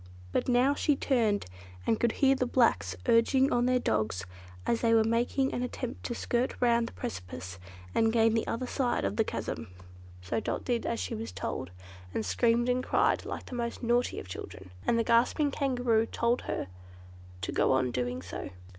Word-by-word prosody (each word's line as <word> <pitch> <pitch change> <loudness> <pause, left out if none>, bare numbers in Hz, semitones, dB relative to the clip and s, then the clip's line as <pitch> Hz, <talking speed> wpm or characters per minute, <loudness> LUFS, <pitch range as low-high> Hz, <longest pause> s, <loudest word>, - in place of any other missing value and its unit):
But - - 0
now 250 +3 +4
she 295 0 +2
turned, 230 -8 +1 0.4
and 225 - +2
could 235 -1 +2
hear 270 -1 +4
the 255 -1 0
blacks, 230 - +2
urging 260 +4 +4
on 245 0 +2
their 255 0 +3
dogs 105 - -1 0.4
as 230 - +1
they 230 -1 +4
were 225 - +5
making 240 +4 +1
an - - -2
attempt 250 0 -4
to 240 - -2
skirt 240 +2 -1
round 235 -1 +3
the - - -10
precipice, 90 0 -6 0.3
and 225 0 +3
gain 225 -1 +4
the 225 - 0
other 240 +3 -2
side 250 - 0
of 100 +1 -1
the - - +3
chasm. - - -4 0.6
So 90 - -1
Dot - - -3
did 240 -2 0
as 115 - -1
she 90 -1 -3
was 110 -2 -5
told, 90 -1 -4 0.5
and 110 - -1
screamed 230 - +2
and 250 0 +1
cried - - +2
like - - -5
the - - -10
most 235 +1 -3
naughty 240 +1 +1
of - - -9
children; 90 0 -8 0.2
and 230 - +3
the 230 - +2
gasping 240 +6 +3
Kangaroo 245 -5 +1
told 235 +1 0
her - - -1 0.8
to 85 - -2
go - - +2
on 130 -1 +2
doing 125 +1 -2
so. 90 - -6
230 Hz, 190 wpm, -30 LUFS, -, 0.8 s, were